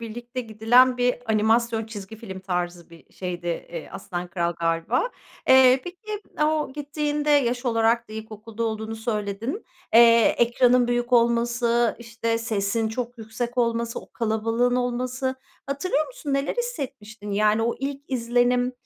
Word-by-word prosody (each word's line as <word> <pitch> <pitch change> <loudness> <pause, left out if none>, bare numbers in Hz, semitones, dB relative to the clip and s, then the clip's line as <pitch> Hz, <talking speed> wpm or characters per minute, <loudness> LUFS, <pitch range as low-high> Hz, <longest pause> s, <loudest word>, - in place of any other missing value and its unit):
birlikte 240 +2 -6
gidilen 240 +3 +4
bir 245 0 +2 0.2
animasyon 225 +1 +2
çizgi 215 -1 -8
film 190 -4 -8
tarzı 175 -2 -3
bir 165 - -17
şeydi, 175 -2 -5
eee, 170 -1 -4
"Aslan 180 -2 -5
Kral" 170 -1 -1
galiba. 165 - 0 0.4
Eee, 260 0 +7
peki, 415 +4 -7 0.2
o 305 -2 0
gittiğinde 295 0 -2
yaş 250 -3 +2
olarak 230 0 +2
da 215 - -11
ilkokulda 220 +1 -7
olduğunu 220 0 -3
söyledin. 220 - -3 0.3
Eee, 230 -1 +7
ekranın 245 +1 +4
büyük 240 +1 -1
olması, 235 0 +2
işte, 230 0 -2
sesin 220 0 -1
çok 245 +1 -5
yüksek 235 +3 -5
olması, 235 -1 0
o - - -17
kalabalığın 230 +2 0
olması, 255 +1 -1 0.3
hatırlıyor 285 +2 0
musun 355 - -6
neler 275 +1 0
hissetmiştin? 230 - -5
Yani, 210 +2 +2
o 235 - 0
ilk 275 +1 -4
izlenim, 245 0 +1
235 Hz, 135 wpm, -24 LUFS, 220-250 Hz, 0.4 s, Eee